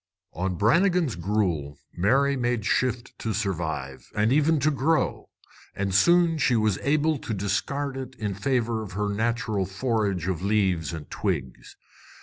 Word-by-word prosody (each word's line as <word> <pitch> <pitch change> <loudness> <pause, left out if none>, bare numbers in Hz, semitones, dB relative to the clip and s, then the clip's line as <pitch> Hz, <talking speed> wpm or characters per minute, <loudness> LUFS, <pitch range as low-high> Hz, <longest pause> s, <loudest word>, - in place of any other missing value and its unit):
On 90 +1 -2
Brannigan's 170 - +2
gruel 85 -6 -1 0.2
Mary 135 +10 +2
made 120 -4 -1
shift 125 -1 0
to 110 -1 -2
survive, 80 -10 -3
and 110 +4 +2
even 155 +2 +3
to 155 +3 +3
grow, 155 +3 0 0.5
and 100 -1 -2
soon 170 - +4
she 125 - +3
was 110 -3 +1
able 150 +2 +1
to 110 - -4
discard 130 +9 -2
it 130 -1 -6
in 105 -4 -3
favor 115 +2 0
of 105 -5 -8
her 105 +2 -1
natural 110 -3 -1
forage 100 -4 -1
of 90 -3 -2
leaves 95 -5 +1
and 80 -3 -7
twigs. 65 -1 -4
110 Hz, 145 wpm, -26 LUFS, 95-135 Hz, 0.5 s, soon